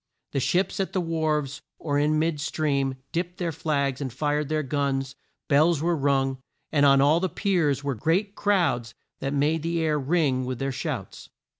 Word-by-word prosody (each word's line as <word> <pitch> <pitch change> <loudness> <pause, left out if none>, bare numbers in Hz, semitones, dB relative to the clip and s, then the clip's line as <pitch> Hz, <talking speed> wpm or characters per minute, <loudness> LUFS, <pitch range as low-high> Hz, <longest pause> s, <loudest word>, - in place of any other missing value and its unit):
The 140 - 0
ships 180 +9 0
at 195 - -1
the 190 - +1
wharves 155 -4 -1 0.2
or 145 -2 -1
in 150 +1 +2
mid 155 -1 0
stream, 140 -3 0 0.2
dipped 175 +1 -3
their 175 -3 -1
flags, 140 -3 -1
and 135 -3 -3
fired 145 +3 -1
their 155 0 0
guns, 135 -1 -1 0.3
bells 155 +2 +4
were 170 +3 +1
rung, 135 -2 +1 0.3
and 145 -2 +4
on 135 0 +6
all 150 +4 +4
the 185 +1 0
piers 165 -7 +1
were 140 -1 -1
great 170 - 0
crowds 140 - +1 0.2
that 135 - -2
made 150 +3 +1
the 165 +1 -1
air 155 -2 +1
ring 140 -3 +1
with 125 0 -3
their 135 +2 -2
shouts. 130 - -5
150 Hz, 180 wpm, -26 LUFS, 135-165 Hz, 0.3 s, on